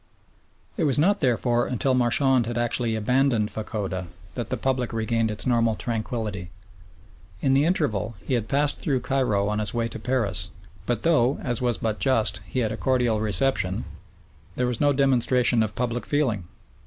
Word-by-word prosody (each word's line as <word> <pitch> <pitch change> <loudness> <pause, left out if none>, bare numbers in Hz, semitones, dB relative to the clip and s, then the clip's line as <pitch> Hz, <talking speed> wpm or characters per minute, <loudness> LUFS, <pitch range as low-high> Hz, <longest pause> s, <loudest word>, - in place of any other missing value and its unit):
It 165 - +1
was 140 -4 +2
not, 200 +7 +3
therefore, 120 - +1
until 130 +2 0
Marchand 125 0 +3
had 120 0 -3
actually 120 -1 0
abandoned 120 0 +1
Fachoda 100 -4 -4 0.3
that 120 - -5
the - - -2
public 130 -2 -1
regained 115 0 0
its 105 -1 -2
normal 115 -3 +2
tranquillity. 110 -5 -3 0.9
In 135 - +2
the 140 +2 +4
interval 120 - 0
he - - -2
had 115 -3 0
passed 145 +2 0
through 135 -4 0
Cairo 120 -8 0
on 105 0 -1
his 105 +2 -1
way 115 -1 0
to 115 - -7
Paris, 110 -7 0 0.4
but 120 -3 -1
though, 145 -5 +3
as 120 0 -1
was 120 -2 +1
but 110 -2 -2
just, 115 -7 +1
he 125 +7 -2
had 110 - 0
a - - -4
cordial 125 -4 +1
reception, 100 -2 0 0.7
there 125 - 0
was 125 -2 -2
no 145 -1 +4
demonstration 130 -3 +3
of 110 -2 -1
public 120 -1 -2
feeling. 125 - 0
120 Hz, 170 wpm, -25 LUFS, 110-130 Hz, 0.9 s, the